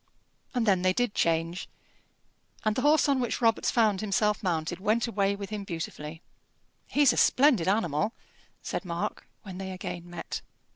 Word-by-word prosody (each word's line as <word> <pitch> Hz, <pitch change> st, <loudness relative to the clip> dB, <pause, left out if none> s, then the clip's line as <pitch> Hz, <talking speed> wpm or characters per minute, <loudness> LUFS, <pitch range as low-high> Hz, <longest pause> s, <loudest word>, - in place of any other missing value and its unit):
And 240 Hz, -2 st, +1 dB
then 190 Hz, -4 st, +3 dB
they 185 Hz, 0 st, +3 dB
did 245 Hz, 0 st, 0 dB
change, 165 Hz, 0 st, 0 dB, 1.0 s
and 215 Hz, 0 st, +2 dB
the 255 Hz, -, 0 dB
horse 300 Hz, +2 st, +4 dB
on 275 Hz, -2 st, +2 dB
which 240 Hz, -3 st, -1 dB
Robarts 225 Hz, -2 st, +2 dB
found 215 Hz, -5 st, +2 dB
himself 210 Hz, 0 st, +1 dB
mounted 170 Hz, -2 st, -1 dB
went 215 Hz, +4 st, +1 dB
away 200 Hz, -3 st, 0 dB
with 200 Hz, 0 st, -7 dB
him 210 Hz, -1 st, -3 dB
beautifully. 160 Hz, -3 st, -6 dB, 0.6 s
"He's 285 Hz, -4 st, +4 dB
a -, -, -4 dB
splendid 255 Hz, -, +4 dB
animal," 195 Hz, -1 st, +1 dB, 0.5 s
said -, -, -3 dB
Mark, 180 Hz, +3 st, -4 dB, 0.2 s
when 190 Hz, -3 st, -8 dB
they 190 Hz, 0 st, -5 dB
again 175 Hz, -2 st, -6 dB
met. 175 Hz, -, -5 dB
200 Hz, 160 wpm, -28 LUFS, 175-225 Hz, 1.0 s, horse